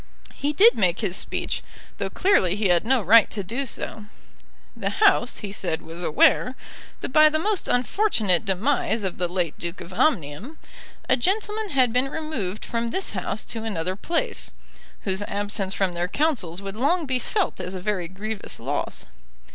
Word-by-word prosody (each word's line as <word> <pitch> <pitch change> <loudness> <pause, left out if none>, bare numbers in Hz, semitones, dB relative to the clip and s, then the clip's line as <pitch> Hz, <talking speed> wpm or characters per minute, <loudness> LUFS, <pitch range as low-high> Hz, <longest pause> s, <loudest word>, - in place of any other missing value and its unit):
He 285 +1 -1
did 425 - +6
make 180 -1 +2
his 190 -5 -1
speech, - - -2 0.4
though - - -1
clearly 195 - +2
he 205 -2 +1
had 175 +4 +3
no 255 -3 +3
right 220 +4 +7
to 205 - -4
do 250 +9 -2
so. 220 -2 -5 0.7
The - - -2
House, 390 - +3
he 200 - -6
said, 180 -5 -3
was 165 +2 -8
aware, 215 +9 +3 0.5
that - - -4
by 310 0 +7
the 310 - 0
most 410 +4 0
unfortunate 245 - +2
demise 220 +2 0
of 190 -3 -3
the 180 - +1
late 175 -3 -2
Duke 170 +1 -5
of 180 - -9
Omnium, 215 - 0 0.5
a - - +4
gentleman 420 - -1
had 255 -7 +3
been 250 +2 +3
removed 265 -12 -4
from 235 0 -2
this 380 +11 -2
House 200 +2 -4
to 225 -1 -5
another 185 -4 -2
place, 350 - -2 0.5
whose 190 0 -1
absence 205 -1 -1
from 190 -2 +1
their 175 0 -2
counsels 200 - -1
would 195 0 -6
long 310 +8 +1
be 260 -2 0
felt 405 - -1
as 185 +2 -5
a - - -4
very 185 -2 -2
grievous 205 +4 -5
loss. - - -3
215 Hz, 175 wpm, -24 LUFS, 185-290 Hz, 0.7 s, right